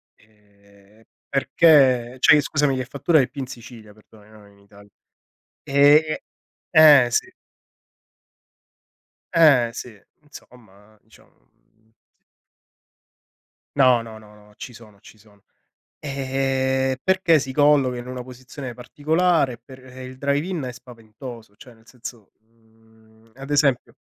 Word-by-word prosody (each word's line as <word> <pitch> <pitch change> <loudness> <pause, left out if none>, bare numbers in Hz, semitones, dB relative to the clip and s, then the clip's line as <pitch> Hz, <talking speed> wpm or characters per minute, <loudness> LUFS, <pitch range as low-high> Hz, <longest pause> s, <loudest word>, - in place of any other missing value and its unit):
Ehm, 100 0 -26 0.3
perché 135 -4 +3
cioè, 145 - +6
i - - +2
scusami, 140 -1 -1
che 130 -1 -4
fattura 150 +5 +1
di 130 - 0
più 140 +1 -8
in 130 - -4
Sicilia, 120 -4 -13
perdonami, 110 0 -22
non 105 -2 -18
in - - -25
Italia. 100 0 -20 0.7
E 145 +3 +3 0.5
eh 150 -6 +7
sì. - - -1 2.0
Eh 140 -8 +4
sì, 110 -4 -10 0.2
insomma 110 -8 -18
diciamo, - - -24
mhmm, 110 0 -39
s 110 - -52 1.5
No, 130 -4 +4
no, 115 -1 -11
no, 105 -1 -19
ci 125 - -10
sono, 110 -3 -17
ci 110 - -18
sono. 105 -1 -24 0.6
Ehm, 135 -1 -2
perché 190 -4 +2
si 135 -1 -5
colloca 145 -3 +2
in 120 0 -8
una 125 0 -7
posizione 130 +1 -10
particolare, 155 +4 0
e - - -16
per 130 0 -15
ehm, 130 0 -11
il 130 0 -12
drive-in 145 +5 -2
è 125 -1 -6
spaventoso, 115 -2 -13
cioè 125 +1 -16
nel 115 0 -26
senso, 120 -4 -12
mhmm, 110 0 -28
ad 135 +1 -11
esempio, 140 -4 0
125 Hz, 130 wpm, -21 LUFS, 110-140 Hz, 2.0 s, eh